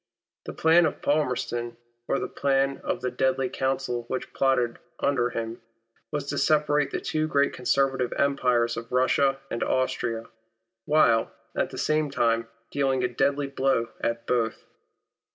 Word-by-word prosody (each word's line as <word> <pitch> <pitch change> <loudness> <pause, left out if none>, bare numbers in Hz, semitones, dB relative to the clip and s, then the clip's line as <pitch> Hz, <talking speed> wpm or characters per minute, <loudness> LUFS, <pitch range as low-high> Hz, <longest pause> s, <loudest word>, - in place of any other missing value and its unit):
The - - -6
plan 165 +1 +5
of - - -6
Palmerston 120 -5 -1
— 120 0 -49
or - - +1
the - - -2
plan 135 0 0
of - - -2
the 125 0 -2
deadly 130 +1 +1
council 130 -3 -2
which 130 - -4
plotted 125 -3 +1 0.2
under 125 -4 +1
him 115 -1 -5 0.2
— 115 - -42
was 145 -2 -2
to 145 - -1
separate 150 -2 +2
the - - -3
two 155 0 -1
great 140 -2 +2
conservative 135 0 +1
empires 125 -4 +1
of 115 +1 -7
Russia 135 +2 +2
and 115 - -3
Austria, 120 -3 0 0.6
while, 115 -7 +3 0.2
at - - 0
the - - -9
same 155 -1 +1
time, 115 -3 +1 0.2
dealing 135 -2 +1
a - - +3
deadly 140 +3 0
blow 135 -4 0
at 115 0 -2
both. 115 -2 -1
130 Hz, 155 wpm, -26 LUFS, 120-140 Hz, 0.6 s, plan